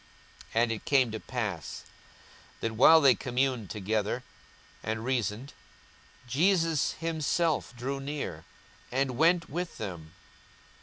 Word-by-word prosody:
42:024:015 115 - +5
And 120 - 0
it 110 - -5
came 130 -5 +3
to 110 - -4
pass, 105 - -4 0.8
that, 115 - -2
while 160 +8 +7
they 135 -3 +7
communed 125 -3 -1
together 110 +3 -1 0.6
and 110 +1 -3
reasoned, 125 0 -2 0.7
Jesus 165 - +2
himself 165 0 0
drew 135 +3 -3
near, 135 - -5 0.5
and 135 +1 +1
went 165 +4 +3
with 175 +4 -4
them. 85 -6 -7
130 Hz, 115 wpm, -29 LUFS, 110-150 Hz, 0.8 s, while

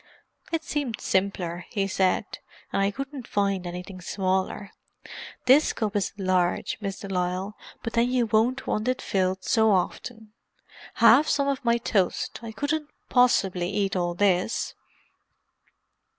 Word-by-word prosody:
"It 325 -1 -1
seemed 290 -8 -3
simpler," 180 -3 -1
he 200 -2 -1
said. 190 +1 +1 0.5
"And - - +2
I 195 - +3
couldn't 270 +2 -6
find 195 -3 0
anything 180 +2 -7
smaller. 190 +2 -1 0.7
This 270 +4 +5
cup 215 -2 -2
is 205 - 0
large, 185 -2 +1
Miss 195 -1 -4
de 200 - -6
Lisle, 185 +2 -2 0.3
but 230 - -4
then 235 +1 +3
you 250 -2 +2
won't 230 +4 +1
want 215 +3 -1
it 255 0 +1
filled 190 -1 -1
so 220 -1 +3
often. 215 +4 -2 0.6
Have 305 - +6
some 280 -1 +2
of 275 -2 -1
my 235 0 +3
toast—I 230 +2 -1
couldn't 295 +5 -2 0.2
possibly 195 -8 +3
eat 200 -1 -1
all 175 -1 -1
this." 190 +2 +1
205 Hz, 135 wpm, -26 LUFS, 185-245 Hz, 0.7 s, Have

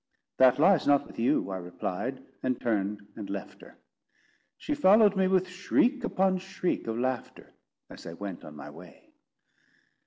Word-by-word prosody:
"That 130 -1 +6
lies 170 +3 +4
not 145 -1 +4
with - - -12
you," 115 -4 +1
I 95 - -3
replied, 95 +8 -5 0.2
and 130 -1 -1
turned 105 -2 -2
and 105 -3 -7
left 100 0 -7
her. - - -15 0.8
She 300 - -3
followed 210 -6 +5
me 190 -1 +2
with 185 -1 +2
shriek 215 +8 +1
upon 190 0 +1
shriek 190 -5 -3
of 115 0 -2
laughter, 130 0 -4 0.3
as - - -12
I 85 - -6
went 95 +1 -7
on 75 - -11
my 75 - -9
way. - - -15
130 Hz, 160 wpm, -28 LUFS, -, 0.8 s, That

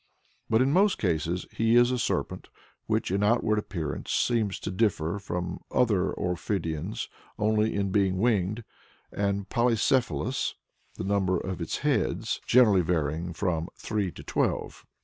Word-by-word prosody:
But 115 +2 +4
in 135 - +1
most 195 +3 +4
cases 85 -1 -1
he 115 +1 +2
is 120 +1 +5
a 125 - 0
serpent 110 - -2 0.4
which - - 0
in 100 +1 +1
outward 110 0 +2
appearance 85 -7 -4
seems 110 -5 +1
to 95 - -3
differ 95 -3 0
from 90 -2 -4
other 110 -7 +2
ophidians 90 0 -3 0.3
only 110 +1 +1
in 100 -1 0
being 95 -2 +2
winged 105 0 +1 0.5
and 100 -1 -1
polycephalous 115 - +1 0.4
the - - -5
number 95 -1 +1
of 95 -3 -4
his - - -3
heads - - 0
generally 110 -7 +6
varying 80 0 -1
from 85 -1 -2
three 105 -3 -2
to - - -10
twelve. - - -2
100 Hz, 140 wpm, -27 LUFS, 90-110 Hz, 0.5 s, generally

